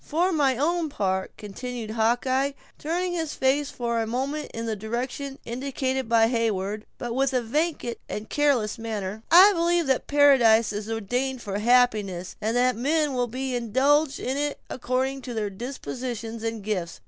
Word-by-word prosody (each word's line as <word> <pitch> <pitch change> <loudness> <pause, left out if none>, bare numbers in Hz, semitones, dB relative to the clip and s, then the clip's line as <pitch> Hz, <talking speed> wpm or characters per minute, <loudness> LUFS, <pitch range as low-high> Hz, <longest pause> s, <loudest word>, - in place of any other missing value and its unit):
"For 350 +5 +1
my 280 -6 +2
own 330 +3 0
part," 190 -7 -2
continued 225 +2 -6
Hawkeye, 250 +5 +1 0.3
turning 350 +4 -1
his 325 -3 -3
face 275 +2 +1
for 235 -1 -2
a 225 - -2
moment 270 +6 -2
in 230 0 -5
the 225 -1 -2
direction 250 +6 -4
indicated 260 0 -2
by 230 -1 +5
Heyward, 215 -3 -1
but 240 -1 -4
with 270 +2 +1
a 250 - +2
vacant 295 0 -1
and 210 +1 -5
careless 255 -7 +1
manner, 215 -2 -4
"I 375 +5 +8
believe 340 -1 +2
that 265 -2 0
paradise 245 -7 +5
is 210 +1 -5
ordained 245 +4 -2
for 200 0 -3
happiness; 210 -6 +2
and 225 +3 0
that 250 0 +3
men 295 +4 +1
will 245 -1 0
be 255 +2 -3
indulged 270 +5 +2
in 260 +2 -2
it 290 0 -2
according 260 +2 -1
to 245 -2 -7
their 210 -2 -2
dispositions 235 0 -5
and 225 -2 -3
gifts. 185 -5 -3
250 Hz, 165 wpm, -25 LUFS, 225-280 Hz, 0.3 s, I